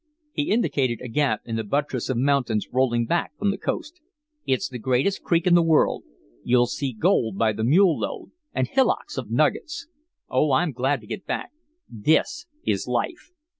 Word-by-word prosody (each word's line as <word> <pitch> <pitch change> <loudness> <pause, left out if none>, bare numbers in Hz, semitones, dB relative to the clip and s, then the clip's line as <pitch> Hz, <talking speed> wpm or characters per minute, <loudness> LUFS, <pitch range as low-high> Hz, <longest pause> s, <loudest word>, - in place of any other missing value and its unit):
He 295 - -2
indicated 135 - +1
a 125 - -7
gap 130 -2 0
in 115 -1 -3
the 110 - -2
buttress 135 +3 -2
of 130 - 0
mountains 125 -5 +1
rolling 120 -2 +2
back 165 0 -1
from 205 +2 +1
the 200 - -4
coast. 330 +3 -4 0.5
"It's 130 -1 +1
the 125 -1 -7
greatest 130 - +1
creek 170 +1 +1
in 180 - +4
the 175 - +6
world. 165 -2 +2 0.4
You'll 120 0 +4
see 130 +2 -3
gold 110 -2 +1
by 110 0 +2
the 110 +1 -3
mule 165 - +4
load, - - -5 0.2
and 130 - 0
hillocks 265 - 0
of - - -7
nuggets. 340 0 0 0.4
Oh, 135 +2 +2
I'm 150 +5 +2
glad 130 +1 0
to - - -14
get 190 - -7
back. - - -3 0.4
THIS 155 - 0 0.2
is - - 0
life. - - -2
130 Hz, 180 wpm, -24 LUFS, 120-170 Hz, 0.5 s, the